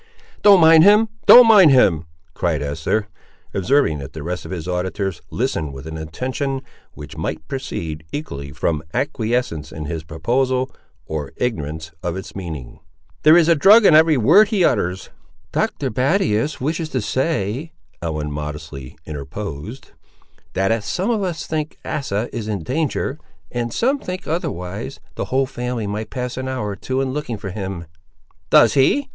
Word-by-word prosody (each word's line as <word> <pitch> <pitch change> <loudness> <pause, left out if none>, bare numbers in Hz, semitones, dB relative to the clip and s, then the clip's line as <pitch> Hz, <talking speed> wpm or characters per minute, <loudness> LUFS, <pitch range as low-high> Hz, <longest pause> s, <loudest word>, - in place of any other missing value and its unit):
"Don't 200 -2 +7
mind 160 -1 +7
him, 210 +3 +6 0.2
don't 245 0 +11
mind 205 -7 +8
him," 95 - +4 0.3
cried 80 -4 -1
Esther, 80 +9 -1 0.5
observing 100 - +2
that 70 -1 -8
the 80 - -7
rest 90 +2 -4
of - - -8
his 90 -2 -5
auditors 95 0 -2
listened 75 -3 -2
with 65 +2 -9
an 80 0 -6
attention 130 - -3 0.3
which - - -10
might 80 0 -4
proceed, 80 - -5
equally, 70 - -6
from 75 +2 -1
acquiescence 120 - -1
in 75 -1 -6
his 80 +1 -4
proposal 125 - 0 0.3
or 75 -3 -5
ignorance 80 -8 -3
of 85 0 -3
its 95 - -8
meaning. 80 -10 -7 0.4
"There 155 +2 +7
is 170 -2 +4
a 170 - +6
drug 200 +8 +6
in 175 - +7
every 155 -1 +6
word 170 - +6
he 200 -5 +2
utters." 95 -4 -1 0.4
"Dr. 135 -3 -1
Battius 135 - +1
wishes 155 +4 -2
to 130 - -1
say," 130 +2 -1 0.3
Ellen 75 -3 -3
modestly 75 -3 -7
interposed, 75 - -7 0.6
"that 95 +3 +1
as 115 -2 0
some 185 - -1
of 220 -3 0
us 175 -5 -3
think 155 -1 -3
Asa 115 -5 -2
is 115 -3 -4
in 100 -6 -3
danger, 145 - -2 0.3
and 120 -1 -2
some 265 - +1
think 185 -4 -6
otherwise, 105 - -4
the - - -4
whole 135 +1 +1
family 125 -3 -4
might 105 +2 -4
pass 125 -1 -4
an 130 0 -3
hour 130 -6 -3
or 100 - -4
two 130 +6 -2
in 130 -1 -2
looking 145 -6 -3
for 100 -2 -6
him." 95 -3 -5 0.6
"Does - - +6
he?" 205 - +3
115 Hz, 165 wpm, -20 LUFS, -, 0.6 s, don't